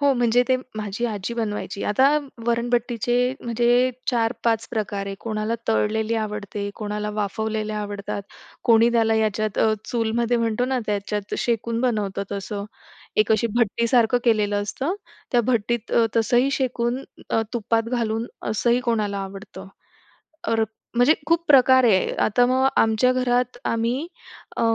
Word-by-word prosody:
हो, 285 -1 +4
म्हणजे 240 0 +3
ते 260 - +4 0.2
माझी 210 +2 -3
आजी 210 +1 -4
बनवायची. 210 -3 -3
आता 260 +7 +4 0.4
वरणभट्टीचे 240 +1 +1
म्हणजे 240 +2 +2 0.2
4-5 230 -1 0
प्रकार 205 -3 -3
आहे. 195 - -4
कोणाला 215 0 -2
तळलेली 220 0 +1
आवडते, 210 -2 -3
कोणाला 210 -1 -4
वाफवलेल्या 215 +1 -2
आवडतात, 205 -1 -5 0.4
कोणी 230 0 +5
त्याला 225 -1 +3
याच्यात 215 -1 0
अ, 220 - +4
चूलमध्ये 235 +1 0
म्हणतो 230 0 0
ना, 260 0 0
त्याच्यात 205 0 -2
शेकून 230 0 -1
बनवतं 210 -6 -1
तसं. 200 +1 -4 0.5
एक 215 +1 +4
अशी 230 +2 +2
भट्टीसारखं 235 +1 +3
केलेलं 205 -3 +2
असतं, 270 - -2 0.4
त्या 240 - +5
भट्टीत 235 -1 -1 0.2
तसंही 240 +4 +3
शेकून 250 -1 -1 0.3
अ, 225 - +2
तुपात 230 -1 0
घालून 230 -1 -1 0.2
असंही 235 +3 +2
कोणाला 215 -5 -1
आवडतं. 195 0 -8 0.8
तर 225 -1 +2 0.3
म्हणजे 245 +6 +5
खूप 335 +1 +1
प्रकार 260 -2 +6
आहे. 200 -6 +3
आता 245 +3 +3
मग 260 +1 +3
आमच्या 225 +3 +3
घरात 250 -1 0
आम्ही 235 +7 -1 0.5
अ, - - 0
230 Hz, 135 wpm, -23 LUFS, 210-245 Hz, 0.8 s, प्रकार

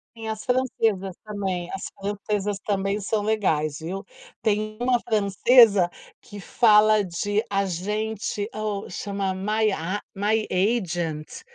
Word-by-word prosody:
Sim, 225 -1 -7
as 220 -1 -4
francesas 225 -7 0
também, 190 -4 -3
as 195 - -5
francesas 205 0 -2
também 200 0 -1
são 205 +1 -1
legais, 160 -9 0
viu? 185 +5 -5 0.4
Tem 215 0 0
uma 245 0 +2
francesa 210 -2 +5 0.3
que 205 - -11
fala 215 0 +4
de 205 +4 -1
agente, 205 +2 -2 0.4
chama 200 0 -2
My 215 +3 +1
A 185 +3 -2 0.2
My 215 +2 +1
Agent, 175 -6 -1
205 Hz, 115 wpm, -24 LUFS, 190-215 Hz, 0.4 s, francesa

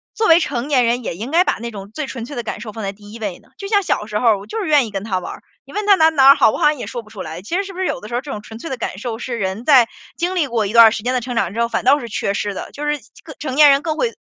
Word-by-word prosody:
作 440 - +1
为 330 - +7
成 275 -4 -3
年 255 -4 +3
人 245 +2 0
也 170 - -4
应 230 +6 -5
该 340 +4 +4
把 - - -1
那 235 0 -5
种 200 0 -9
最 295 +3 -5
纯 240 -4 -6
粹 265 +2 -8
的 - - -1
感 215 - -5
受 220 -2 -7
放 220 - -8
在 195 - -3
第 205 +1 -15
1 230 - -10
位 200 -5 -4
呢？ - - -25
就 395 - -6
像 405 -2 +2
小 210 - -1
时 210 -1 -3
候 225 -3 +3
我 200 +2 -11
就 445 - -4
是 370 - -3
愿 290 -6 +4
意 - - -10
跟 195 -1 -4
他 190 -4 -1
玩 - - -7
儿， - - -13 0.2
你 - - -14
问 420 0 -2
他 405 -1 +6
哪 320 -3 +5
哪 275 -4 +5
儿 275 - +9
好， - - +4
我 - - -4
好 - - -3
像 300 0 +3
也 - - -6
说 240 -2 -6
不 215 - -18
出 205 -3 -9
来。 160 +2 -7
其 330 - -4
实 395 - -1
是 390 - -9
不 365 - -9
是 375 - 0
有 270 - -2
的 210 - -10
时 235 - -5
候， 245 - 0
这 280 -1 -8
种 210 - -5
纯 220 +1 -11
粹 325 - -7
的 265 - -4
感 195 - -4
受 225 0 -5
是 240 -2 -4
人 195 +3 -3
在 255 -6 +6 0.3
经 360 +2 -2
历 310 -6 +1
过 230 -3 0
一 - - -4
段 230 0 +8
儿 220 - +6
时 210 - -4
间 250 +1 0
的 255 - +1
成 245 0 -6
长 190 -5 0
之 230 - -4
后， 235 - +2
反 - - -2
倒 280 +4 +4
是 235 - -7
缺 200 -2 -2
失 205 0 -2
的， - - -7
就 295 +1 -6
是 295 - +2 0.3
更 310 - -10
成 265 -3 -4
年 295 -1 +8
人 275 +1 +3
更 315 -1 -3
会 475 -2 0
240 Hz, 410 characters per minute, -19 LUFS, 215-295 Hz, 0.3 s, 儿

